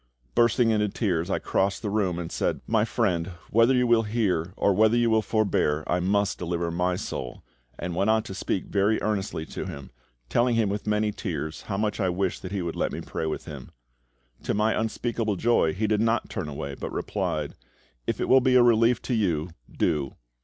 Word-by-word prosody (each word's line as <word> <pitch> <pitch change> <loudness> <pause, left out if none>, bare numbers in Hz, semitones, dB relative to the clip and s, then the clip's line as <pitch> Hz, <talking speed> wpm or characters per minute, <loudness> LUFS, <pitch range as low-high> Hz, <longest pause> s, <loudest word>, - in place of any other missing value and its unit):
Bursting 115 0 +3
into 105 -1 +1
tears, 90 -5 -1
I - - +1
crossed 95 +3 0
the 105 - -1
room 95 -5 0
and 85 -1 -5
said, - - -1
"My 110 -1 +2
friend, 95 -7 0 0.2
whether 115 +4 +5
you 125 0 +3
will 120 -1 +4
hear 105 -6 0
or 100 - +3
whether 110 +4 +4
you 120 -1 +3
will 110 0 +4
forbear, 100 -9 +1
I 90 - 0
must 100 +2 +1
deliver 85 -1 -2
my 90 +1 0
soul," 65 -7 -5 0.3
and 85 0 -4
went 100 +4 +1
on 110 0 +3
to - - -7
speak 95 -1 -2
very 105 +2 +1
earnestly 100 -6 -2
to - - -6
him, 70 -1 -8 0.4
telling 120 - +2
him 110 -3 +2
with 105 +1 -4
many 105 0 +1
tears 80 -5 -4
how 100 - -1
much 105 0 -1
I 95 -3 +1
wished 90 +1 -1
that 95 - -7
he 100 -3 -2
would 85 -1 -4
let - - -1
me - - -5
pray 80 - -4
with 80 - -4
him. - - -9 0.7
To - - -1
my 110 +2 +2
unspeakable 110 -1 -1
joy 115 -5 +2
he 105 +6 -2
did 105 0 +1
not 115 +1 0
turn 90 -7 -3
away, 70 -1 -5
but - - -6
replied, 75 -2 -2 0.5
"If - - -1
it - - -1
will 130 0 +6
be 130 0 +3
a 125 - +7
relief 115 0 +4
to 125 - -2
you, 90 -7 0 0.2
do." 75 -5 -1
105 Hz, 210 wpm, -26 LUFS, 90-110 Hz, 0.7 s, a